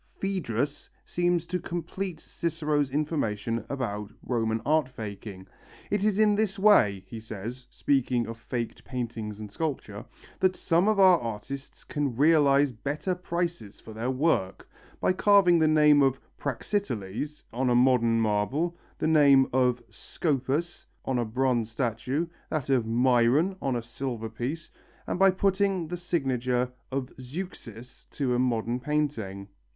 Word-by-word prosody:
Phœdrus 145 - -2 0.2
seems 175 -1 0
to 180 +1 -2
complete 175 +1 -4
Cicero's 150 -5 -1
information 115 -7 -1
about 105 -6 -3
Roman 115 -2 0
art 155 -3 +2
faking. 100 -5 -8 0.5
"It 205 -1 +1
is 210 -2 +2
in 215 -1 +5
this 210 0 0
way," 105 - +4
he 110 +4 -8
says, 110 +4 -7
speaking 125 -3 +1
of 115 +1 -7
faked 120 0 -4
paintings 115 -4 -5
and 105 -2 -8
sculpture, 155 +4 -4 0.4
"that 185 0 +2
some 175 +2 +2
of 215 -2 +2
our 185 -3 +7
artists 120 +5 -7
can 145 -8 -2
realize 145 -1 +4
better 145 - -3
prices 170 - -4
for 110 - -11
their 115 +3 -3
work: 130 - 0 0.3
by - - +2
carving 185 -3 +5
the 160 - +4
name 150 -1 +5
of 135 -1 +2 0.2
Praxiteles 140 - -3
on 125 +2 0
a 120 - +3
modern 120 -2 +4
marble, 115 +11 0 0.2
the - - -2
name 140 -4 +6
of 125 -2 +2
Scopas 150 +2 -2 0.2
on 130 -2 0
a 120 - 0
bronze 120 -1 0
statue, 125 +6 -1 0.2
that 140 -3 -2
of 125 -4 +2
Myron 125 +9 +3
on 135 -2 0
a 120 - -2
silver 120 -2 -5
piece, 125 +9 -4 0.4
and - - -3
by 195 0 +7
putting 190 -2 +1
the 175 - -3
signature 130 -7 -1 0.2
of 130 -1 -3
Zeuxis 125 - -8
to 130 -4 -1
a 120 - +1
modern 120 -1 0
painting." 125 -10 -2
135 Hz, 145 wpm, -27 LUFS, 115-165 Hz, 0.5 s, our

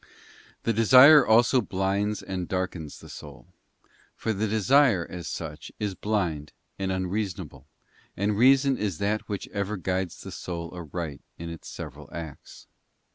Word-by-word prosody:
The 115 - +1
desire 130 +7 +8
also 120 +3 +5
blinds 100 +1 -1
and 95 -2 -4
darkens 90 -5 -4
the - - -12
soul, - - -11 0.7
for 110 - -2
the 110 +2 -1
desire, 110 -2 +4
as 90 -2 -7
such, - - -6
is 105 -2 -2
blind 90 -8 -2 0.3
and 95 -1 -1
unreasonable, 95 +1 -3 0.5
and 100 +2 0
reason 135 +3 +4
is 100 -6 -2
that 105 +4 -1
which 100 -2 -4
ever 100 0 -3
guides 95 -1 -2
the 95 - -8
soul 85 -2 -6
aright 85 -3 -6 0.2
in 85 0 -6
its 85 - -9
several - - -9
acts. 80 -3 -9
95 Hz, 140 wpm, -26 LUFS, 90-110 Hz, 0.7 s, desire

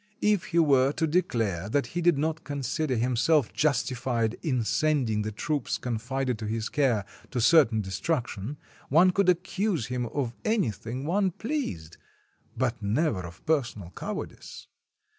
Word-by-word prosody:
If 210 -4 +3
he 170 - -2
were 140 -5 +5
to 160 - 0
declare 115 - 0
that 140 +5 +1
he 175 - -1
did 170 -3 +4
not 160 +2 -1
consider 140 0 -2
himself 125 +4 +2
justified 125 -5 0
in 130 -8 0
sending 135 -5 +1
the 110 +1 -3
troops 145 +5 -2
confided 125 +1 -2
to 110 - -4
his 110 +1 -2
care 125 -9 +1 0.2
to 125 - -2
certain 120 -4 +5
destruction, 110 - -3 0.3
one 175 +6 +6
could 195 0 +2
accuse 180 - 0
him 125 0 -2
of 125 -2 -2
anything 130 - -1
one 190 +4 +2
pleased, 180 - -4 0.6
but 125 -3 -1
never 110 - +1
of 85 -1 -11
personal 120 - -1
cowardice. - - -6
130 Hz, 140 wpm, -27 LUFS, 115-160 Hz, 0.6 s, one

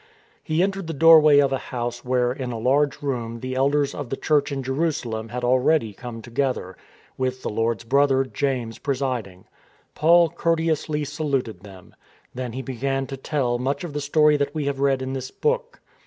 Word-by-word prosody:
He 160 +3 +1
entered 195 -2 -2
the 165 - -3
doorway 155 -1 +7
of 140 -1 +4
a 135 - 0
house 120 -1 -4
where 125 -1 +1
in 130 -2 -4
a 115 - -4
large 140 +5 +1
room 120 -4 -3
the 130 +2 -5
elders 140 +2 +1
of 145 -4 -6
the 135 - -3
Church 150 -2 +1
in 135 -1 -3
Jerusalem 130 -6 -2
had 125 +2 -5
already 125 -1 +2
come 115 +1 -8
together, 120 -7 -2 0.4
with 130 0 -2
the - - -2
Lord's 115 +1 -1
brother, 135 +2 +3
James, 130 -5 -3
presiding. 125 -9 -3 0.5
Paul 170 +1 +5
courte 165 -1 0
ously 150 -1 -1
saluted 140 -5 -2
them. 95 -3 -14 0.4
Then 125 -2 -5
he 130 +2 -5
began 135 +1 -2
to 135 - -6
tell 130 -3 -1
much 135 +4 -2
of 170 -4 -6
the 145 - -3
story 150 +1 +3
that 140 +1 -2
we 150 -2 -2
have 140 -1 -2
read 135 -1 +1
in 130 0 -4
this 130 -1 -4
book. 480 +1 -2
135 Hz, 185 wpm, -23 LUFS, 125-145 Hz, 0.5 s, doorway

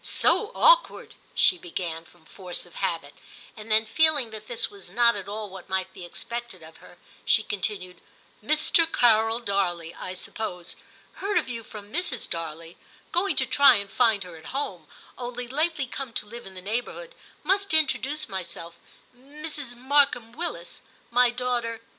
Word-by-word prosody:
*So 435 0 +3
awkward,' - - +4 0.2
she 180 - +5
began, 165 -1 -5
from 175 -2 -23
force 180 -1 -5
of 175 - -18
habit; 165 -6 -2 0.4
and 215 0 -9
then 220 +1 +4
feeling 285 0 +3
that 215 0 -9
this 240 - -1
was 200 -3 -10
not 235 +4 +4
at 200 -1 -6
all 210 +1 -4
what 190 -1 -10
might 190 0 0
be 185 - -10
expected 235 +1 -7
of 160 +1 -13
her, 175 - -16 0.3
she 220 - +3
con 205 -2 -3
tinued, 185 -3 -3 0.3
* - - -32
Mr. 310 +5 +3
Carol 225 -1 +4
Darley, 180 -6 -1
I 185 - -6
suppose 180 -2 -5 0.2
— - - -28
heard 405 +2 +1
of - - +1
you 235 -2 -4
from 210 0 -11
Mrs. 310 -8 0
Darley 165 0 -6 0.2
— - - -29
going 360 -1 +2
to - - +3
try 280 0 +7
and 200 -1 -3
find 225 -4 +3
her 180 -2 -10
at 160 - -15
home 275 +2 -4 0.2
— - - -23
only 245 0 -5
lately 300 +2 0
come 260 -1 -6
to - - -2
live 235 +2 -10
in 190 - -12
the 185 - -9
neighbourhood 245 - -3 0.2
— - - -30
must 395 +1 +1
introduce 300 -1 +2
myself 170 -4 -6 0.2
— - - -30
Mrs. 290 0 -6
Markham 255 -2 +2
Willis; 345 +8 -5 0.3
my 245 +1 +5
daughter. 240 -2 -1
225 Hz, 185 wpm, -26 LUFS, 190-265 Hz, 0.4 s, try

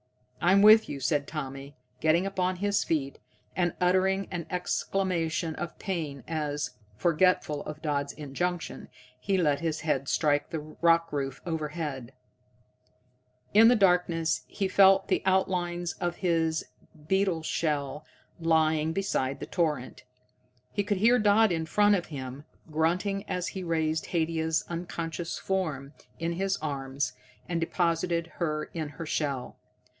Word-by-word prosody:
"I'm 190 +3 +5
with 215 +1 +8
you," 140 - -4
said 140 +2 0
Tommy, 140 -2 -6 0.2
getting 160 +4 +3
upon 185 -1 0
his 200 +2 +1
feet, 140 -4 -2 0.4
and 175 -2 0
uttering 190 +2 +2
an 175 -3 -4
exclamation 180 -3 -1
of 170 0 -6
pain 155 -8 -4
as, 150 -5 -2 0.3
forgetful 170 -2 +2
of 155 +1 -7
Dodd's 145 -2 -1
injunction, 165 +5 -4 0.3
he 190 +10 0
let 150 -5 +2
his 160 -1 -2
head 140 -4 -1
strike 145 -2 +1
the 165 - -3
rock 165 +2 +1
roof 135 -2 -2
overhead. 150 -6 -4 1.4
In 220 +2 +8
the 245 - +6
darkness 180 -5 +2
he 195 - -2
felt 195 0 +5
the - - +1
outlines 175 -2 0
of 175 0 -1
his 165 -3 0 0.4
beetle 190 -4 +1
shell 150 -2 -1 0.4
lying 160 -1 +2
beside 140 -8 -1
the - - -5
torrent. 150 -7 -2 0.7
He 205 - -1
could 205 0 0
hear 235 +5 +5
Dodd 210 0 +4
in 160 -2 -1
front 205 +5 +4
of 180 -4 0
him, 135 -1 -7 0.3
grunting 185 +6 0
as 180 -1 -1
he 190 - -6
raised 160 -2 0
Haidia's 160 -1 0
unconscious 170 -1 -4
form 155 -8 -2 0.2
in 165 +1 -2
his 195 +2 0
arms 140 -2 -3 0.3
and 170 -1 -1
deposited 170 0 0
her 155 -3 -2
in 160 -3 -3
her 160 +3 -7
shell. 140 -5 -2
165 Hz, 135 wpm, -28 LUFS, 150-185 Hz, 1.4 s, with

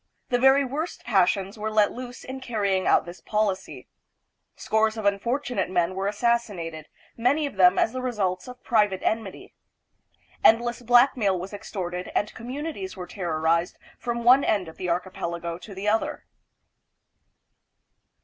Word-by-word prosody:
The 245 - +2
very 270 +2 +5
worst 300 +7 -4
passions 195 -1 +1
were 215 +1 -2
let 215 -1 +3
loose 245 0 -8
in 260 +1 -7
carrying 200 -6 0
out - - +4
this 175 +1 -10
policy. 210 -3 -2 0.7
Scores 220 0 +1
of 215 - -4
unfortu 240 +6 0
nate 190 -3 0
men 175 -1 +1
were 190 +1 -2
assassinated, 205 -8 -1 0.3
many 270 +6 +2
of 285 - -5
them 185 0 +5
as 225 - +2
the 255 - -3
results 195 -7 -2
of 250 0 -11
private 210 -5 +2
enmity. 220 -4 -3 0.9
Endless 240 +2 +4
blackmail 240 -5 +4
was 185 +3 -7
extorted 180 -3 -5
and 210 - 0
communities 295 +10 -6
were 180 - -5
terrorized 170 -1 -1 0.2
from 235 -1 -3
one 255 +4 +6
end 200 -5 +1
of 160 - -11
the 180 - -3
archi 180 +2 -1
pelago 170 -1 -4
to 200 +1 -10
the 195 +2 -4
other. 220 +1 0
210 Hz, 150 wpm, -25 LUFS, 185-245 Hz, 0.9 s, one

